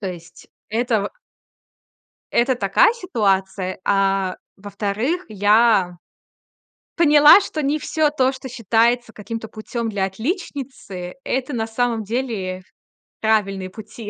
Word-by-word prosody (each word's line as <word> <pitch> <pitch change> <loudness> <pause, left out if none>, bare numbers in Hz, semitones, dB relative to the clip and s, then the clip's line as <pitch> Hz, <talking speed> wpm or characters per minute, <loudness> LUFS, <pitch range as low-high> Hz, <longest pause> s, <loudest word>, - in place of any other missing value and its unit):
То 195 - -3
есть 170 -1 -12 0.2
это 230 0 0
в - - -4 1.2
это 250 +2 +3
такая 200 - +4
ситуация. 195 - -1
А 195 -1 +1 0.2
во-вторых, 205 - -2
я 205 -3 +3 1.0
поняла, 300 +3 +8
что 315 -5 -4
не 290 +3 0
всё 310 0 +1
то, 265 -3 +1
что 260 0 -8
считается 235 0 +1
каким-то 220 +1 -7
путём 225 +1 -5
для 195 -2 0
отличницы- 240 - -5
это 260 +2 -2
на 225 -2 -2
самом 230 0 -1
деле 205 -6 -3 0.6
правильные 195 -4 0
пути. 215 +2 -10
220 Hz, 115 wpm, -21 LUFS, 195-255 Hz, 1.2 s, поняла